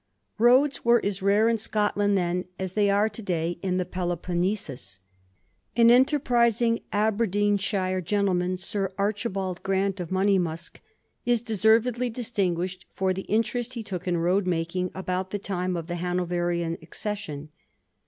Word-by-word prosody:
Roads 255 +5 +4
were 235 0 +5
as 200 -1 -2
rare 205 +3 +4
in 230 -1 +2
Scotland 205 -2 +1
then 180 0 -1
as 190 -1 -4
they 205 -1 +2
are 200 +2 +3
to 220 +1 -7
day 175 -3 -2
in 185 -2 0
Peloponnesus. 175 - -3 0.8
Anenterprisiiig 235 -2 +4
Aberdeenshire 205 -3 +1
gentleman, 185 -1 0
Sir 195 +1 -3
Archibald 200 -3 -2
Grant, 195 0 0
of 175 -2 -4
Monjmausk, 185 -4 0 0.4
is 240 -2 +1
deservedly 230 +3 +2
distinguished 185 -7 -2
for 190 -1 +1
the 190 +1 -6
inte 225 +2 +1
rest 245 +1 -3
he 230 - -4
took 185 -3 -6
in 175 -1 +1
road 180 +3 +1
making 180 +1 -1
about 185 0 -2
the 205 - -2
time 185 -2 -2
of 165 - -4
the 175 +1 -4
Hanoverian 175 -1 -1
accession. 160 -4 -5
195 Hz, 135 wpm, -26 LUFS, 180-215 Hz, 0.8 s, were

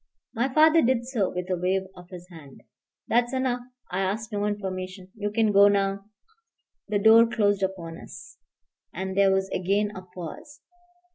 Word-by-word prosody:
My 250 +4 -1
father 315 +3 +5
did 240 -2 +1
so 235 -7 -1
with 180 0 -5
a - - +2
wave 185 +2 0
of 180 0 -14
his 180 -2 -11
hand. 145 -5 -14 0.4
"That's 240 +2 +1
enough. 255 -1 -1 0.3
I 180 - -2
asked 210 +4 -2
no 205 0 -1
information. 185 -2 -5
You 210 -2 -3
can 215 0 +1
go 200 0 +7
now." 195 -1 0 0.8
The 210 - 0
door 225 +3 +6
closed 205 -3 +1
upon 180 -4 -4
us, - - -12 0.5
and 190 0 -5
there 195 0 +4
was 190 0 +1
again 200 +3 0
a 185 - -7
pause. 185 - -10
200 Hz, 165 wpm, -25 LUFS, 185-230 Hz, 0.8 s, go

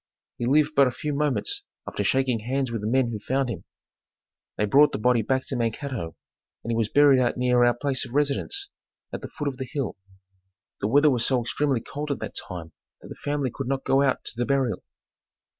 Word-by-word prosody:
He 120 - -1
lived 150 +3 +3
but 140 -1 +6
a - - 0
few 150 +4 -4
moments 150 - -1 0.3
after - - -2
shaking 130 -3 +1
hands 130 +3 -2
with 115 -2 -3
the 105 - -2
men 125 0 +2
who 110 - -4
found 130 +4 -1
him. 90 -7 -7 0.9
They 105 - +2
brought 145 +7 +5
the - - 0
body 120 +2 +3
back 130 +4 0
to 135 - -4
Mankato 115 - -3 0.5
and 115 - -3
he - - +1
was 115 -2 0
buried 145 -2 +6
out 120 - +1
near 125 0 +3
our 120 0 +4
place 135 0 -1
of 125 +1 -8
residence, 150 - 0 0.4
at - - -4
the - - -6
foot 150 -2 -4
of 135 -2 -3
the 130 -2 -5
hill. 140 -9 -3 0.8
The 100 - 0
weather 145 +6 +5
was 120 -3 +1
so 130 -2 +2
extremely 130 +1 0
cold 150 +5 -6
at 140 - -1
that - - -6
time 85 -4 -6 0.3
that - - -13
the - - -10
family 145 -3 -1
could 135 - -4
not 135 0 -2
go 135 - +3
out 135 -2 +1
to - - -4
the 120 +1 -1
burial. 135 -4 +1
130 Hz, 220 wpm, -25 LUFS, 120-140 Hz, 0.9 s, but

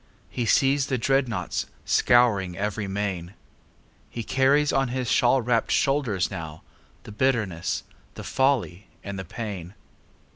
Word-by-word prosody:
He 120 -3 -2
sees 135 +3 +3
the 130 - 0
dreadnaughts 120 -7 0 0.2
scouring 105 -7 +3
every 105 +1 -2
main. 95 -2 -3 0.7
He 115 - -5
carries 140 +5 +2
on 135 0 +2
his 125 0 -2
shawl 125 +1 +3
wrapped 115 -1 +1
shoulders 125 -10 +1
nowThe 80 +4 -11
bitterness, 105 -10 0 0.3
the - - -8
folly 130 -8 0 0.2
and 100 -1 -5
the 95 - -6
pain. 100 -2 -6
115 Hz, 120 wpm, -25 LUFS, 95-130 Hz, 0.7 s, sees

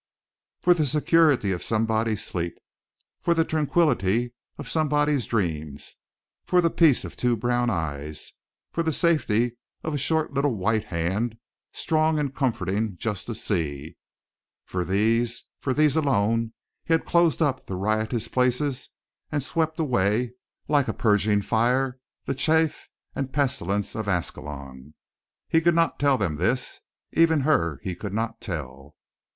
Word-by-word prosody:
For 180 - +6
the 155 -4 0
security 150 - +3
of 90 - -2
somebody's 110 -1 0
sleep, 85 -1 -3 0.6
for 170 - +2
the 165 -1 +3
tranquillity 135 - +1 0.2
of - - -7
somebody's 150 -4 +1
dreams; 80 -9 -3 0.5
for 180 - +2
the 170 -2 +3
peace 160 -7 +4
of - - -8
two 120 -1 +1
brown 120 +2 +1
eyes, 75 -5 -4 0.4
for 170 - -1
the 160 -1 0
safety 120 - +1 0.3
of 155 - -3
a 145 - -1
short 160 +2 0
little 140 -2 +1
white 110 +2 0
hand, 95 +7 -2 0.3
strong 155 -1 +1
and 145 -3 -1
comforting 110 - -1
just 105 0 -4
to 115 - -4
see 80 -9 -3 0.7
for 90 -1 -2
these, 115 +6 +1 0.2
for 135 - -2
these 150 +1 +3
alone, 115 -6 +1 0.3
he 165 - +3
had 160 - -2
closed 170 -2 +3
up 145 -5 0
the 95 - -4
riotous 110 +4 -1
places 130 +2 0 0.4
and 145 -2 -1
swept 160 +2 -1
away 120 -4 +1 0.3
like 145 -3 +2
a - - -1
purging 105 -2 +2
fire 125 +4 +1 0.3
the - - -1
chaff 160 +3 +1 0.3
and 135 -1 -4
pestilence 115 -9 -1
of 110 -2 -4
Ascalon. 75 -6 -5 0.5
He 165 - +3
could 170 0 +3
not 165 0 +2
tell 140 -2 +3
them 90 -9 -1
this. 120 - -1 0.3
Even 160 -2 +4
her 85 - +1
he 95 - -3
could 100 +3 -6
not 115 +1 -2
tell. 70 - -6
120 Hz, 145 wpm, -25 LUFS, 100-150 Hz, 0.7 s, For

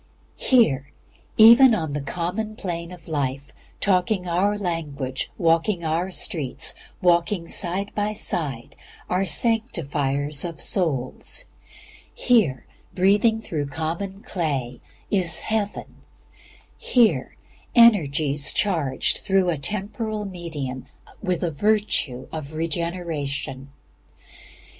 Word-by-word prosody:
Here, 145 - +3 0.5
even 235 +2 +8
on 160 -7 -3
the 145 - -2
common 180 +9 -3
plane 170 -4 -5
of 180 -2 -12
life, 140 -3 -2 0.3
talking 185 -1 +1
our 195 +5 +1
language, 150 -8 -3
walking 170 +2 +1
our 165 +4 0
streets, 160 - -1 0.3
working 175 0 +2
side 190 +3 -1
by 210 0 -1
side, 145 - -3 0.4
are 185 +2 +1
sanctifiers 150 - 0
of 170 -3 -5
souls; 160 - 0 0.7
here, 205 - +2 0.3
breathing 205 +4 +3
through 150 -8 -3
common 170 +7 -4
clay, 135 - -3 0.3
is 175 -5 +2
Heaven; 215 -2 -3 0.8
here, 240 -3 +2 0.4
energies 155 - +4
charged 160 -10 +1
even - - -11
through 190 -2 +3
a 160 - -2
temporal 210 - -3
medium 160 -9 -6 0.3
with 185 -4 -1
the 170 - 0
virtue 160 -8 0
of 155 -2 -6
regeneration. 155 -4 -3
170 Hz, 100 wpm, -23 LUFS, 145-205 Hz, 0.8 s, even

